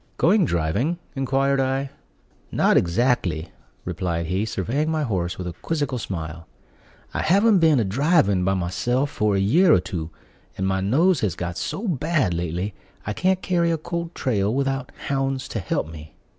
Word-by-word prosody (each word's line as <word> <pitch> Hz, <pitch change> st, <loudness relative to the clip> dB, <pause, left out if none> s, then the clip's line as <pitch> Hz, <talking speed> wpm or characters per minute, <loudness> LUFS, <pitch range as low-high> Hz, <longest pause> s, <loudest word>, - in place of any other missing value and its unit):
"Going 190 Hz, +2 st, +4 dB
driving?" 100 Hz, -, 0 dB, 0.2 s
inquired 135 Hz, +1 st, +1 dB
I. 135 Hz, +1 st, 0 dB, 0.6 s
"Not -, -, +3 dB
exactly," 90 Hz, -, +1 dB, 0.3 s
replied 85 Hz, -2 st, -2 dB
he, 95 Hz, +5 st, -1 dB
surveying 120 Hz, -, -1 dB
my 155 Hz, -1 st, 0 dB
horse 90 Hz, -8 st, -2 dB
with 90 Hz, -, -5 dB
a 90 Hz, -, -4 dB
quizzical 145 Hz, -, -2 dB
smile; 80 Hz, -5 st, -6 dB, 0.7 s
"I -, -, -1 dB
haven't 200 Hz, +4 st, +4 dB
been 160 Hz, -5 st, +4 dB
a -, -, +2 dB
driving 100 Hz, -, +2 dB
by 95 Hz, +1 st, +2 dB
myself 120 Hz, +10 st, 0 dB
for 105 Hz, -1 st, +1 dB
a -, -, +2 dB
year 160 Hz, -, +4 dB
or -, -, +6 dB
two; 85 Hz, -3 st, -5 dB, 0.5 s
and 95 Hz, -, -1 dB
my 95 Hz, 0 st, 0 dB
nose 155 Hz, -, +3 dB
has 95 Hz, -7 st, -1 dB
got 85 Hz, 0 st, -4 dB
so 210 Hz, -, -3 dB
bad 155 Hz, -, +1 dB
lately, 85 Hz, +4 st, -2 dB, 0.3 s
I 105 Hz, -, -2 dB
can't 185 Hz, -, +1 dB
carry 170 Hz, -2 st, +1 dB
a 165 Hz, -, +1 dB
cold 170 Hz, +1 st, -5 dB
trail 105 Hz, -5 st, 0 dB
without 135 Hz, 0 st, -1 dB, 0.2 s
hounds 135 Hz, -1 st, -1 dB
to 115 Hz, -, -3 dB
help 85 Hz, -, -2 dB
me." 75 Hz, -1 st, -11 dB
120 Hz, 170 wpm, -23 LUFS, 90-150 Hz, 0.7 s, or